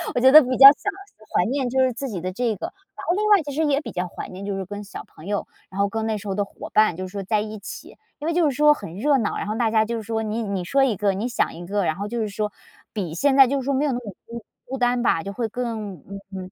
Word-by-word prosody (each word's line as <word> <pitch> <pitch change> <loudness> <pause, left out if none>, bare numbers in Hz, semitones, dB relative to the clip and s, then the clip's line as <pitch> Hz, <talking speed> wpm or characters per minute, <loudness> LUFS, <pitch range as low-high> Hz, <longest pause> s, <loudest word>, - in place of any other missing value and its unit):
我 - - +2
觉 260 +2 +6
得 310 - +11
比 255 -2 -1
较 270 - +9
想 400 +7 -3 0.4
怀 180 - +3
念 260 +1 -1
就 265 +2 0
是 260 - +3
自 275 +3 -5
己 200 -8 -5
的 185 +2 -3
这 230 +2 -1
个。 - - -5 0.3
然 - - -8
后 350 - +2
另 425 - 0
外 410 -3 +6
其 285 - -6
实 310 +3 0
也 290 0 +2
比 - - -7
较 180 0 -3
怀 - - -8
念 190 +2 -8
就 200 - -2
是 195 - -3
跟 205 +2 -7
小 205 - -9
朋 155 - -16
友， 205 +1 -2 0.2
然 190 - -8
后 200 - +2
跟 220 +1 -3
那 220 -1 -1
时 205 - -9
候 195 - -2
的 205 0 0
伙 - - -10
伴， 215 -6 +4
就 185 +1 -5
是 - - -13
说 200 -1 -5
在 210 +2 +1
一 215 0 -6
起， 200 - -10 0.2
因 300 - -4
为 335 - +1
就 330 -3 +3
是 270 - -4
说 300 +1 +6
很 170 - -9
热 280 +6 +2
闹， 215 -4 -1
然 - - -4
后 215 - -2
大 225 -1 +1
家 220 -1 +4
就 230 +2 -3
是 220 - -6
说 220 +1 -2
你 220 +2 -2
你 200 -3 -3
说 270 +10 +2
一 245 -6 +2
个， 200 0 +1
你 205 +5 -2
想 250 - 0
一 175 +1 -8
个， 205 +2 -1
然 155 - 0
后 200 +2 -4
就 235 +2 -3
是 215 - -2
说 210 +1 -3 0.4
比 185 -7 -3
现 280 +6 +2
在 270 -1 +8
就 275 +2 0
是 260 - -6
说 280 - 0
没 275 +3 +1
有 290 - +1
那 245 - -1
么 225 -5 -7
孤 235 -1 -8 0.2
孤 265 - -4
单 245 -1 +1
吧， 165 -8 +1
就 200 - -6
会 230 +2 -2
更 220 -4 -4 0.4
嗯， 185 -1 -7
220 Hz, 340 characters per minute, -23 LUFS, 200-265 Hz, 0.4 s, 得